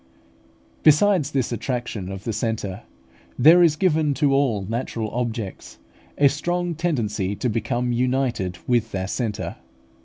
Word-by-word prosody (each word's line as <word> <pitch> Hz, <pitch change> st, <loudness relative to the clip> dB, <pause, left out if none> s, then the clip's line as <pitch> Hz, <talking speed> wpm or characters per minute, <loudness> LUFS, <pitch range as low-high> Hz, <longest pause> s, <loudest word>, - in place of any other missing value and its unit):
Besides 155 Hz, 0 st, +4 dB
this 135 Hz, -5 st, -1 dB
attraction 115 Hz, -5 st, -3 dB
of 95 Hz, 0 st, -7 dB
the 115 Hz, -, -3 dB
centre, 105 Hz, -2 st, -3 dB, 0.6 s
there 160 Hz, +7 st, +7 dB
is 165 Hz, -3 st, +5 dB
given 155 Hz, -5 st, +1 dB
to 140 Hz, 0 st, +2 dB
all 125 Hz, -8 st, +1 dB
natural 115 Hz, -1 st, -3 dB
objects 115 Hz, -5 st, -4 dB, 0.4 s
a 145 Hz, -, +6 dB
strong 175 Hz, +5 st, -1 dB
tendency 110 Hz, -, -1 dB
to 125 Hz, -, -2 dB
become 120 Hz, +2 st, -1 dB
united 125 Hz, -7 st, 0 dB
with 115 Hz, -3 st, +1 dB
their 95 Hz, -1 st, -2 dB
centre. 110 Hz, -1 st, -3 dB
120 Hz, 130 wpm, -23 LUFS, 110-145 Hz, 0.6 s, there